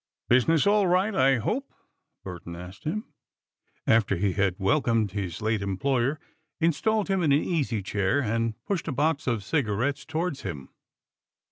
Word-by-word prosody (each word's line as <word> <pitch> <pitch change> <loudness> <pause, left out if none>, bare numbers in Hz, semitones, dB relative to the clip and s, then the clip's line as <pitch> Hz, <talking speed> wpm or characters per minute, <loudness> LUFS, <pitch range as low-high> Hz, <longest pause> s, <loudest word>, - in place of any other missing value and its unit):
"Business 140 - +4
all 205 -1 +4
right, 185 +4 +2
I 135 -5 +4
hope?" 240 - -2 0.5
Burton 85 -2 -7
asked 90 +2 -10
him, 215 +8 -2 0.8
after 110 -3 +3
he 95 +1 0
had 100 -2 +1
welcomed 115 -1 +1
his 95 0 -4
late 110 -1 +1
employer, 125 +8 0 0.4
installed 190 +7 +1
him 195 -1 +1
in 155 -4 +2
an 140 +2 +4
easy 135 - -1
chair 100 +6 0
and 115 -2 -1
pushed 195 -5 -2
a - - -1
box 145 +2 0
of 115 -5 0
cigarettes 140 +2 0
towards 160 -3 -3
him. 75 -10 -6
125 Hz, 150 wpm, -26 LUFS, 100-160 Hz, 0.8 s, Business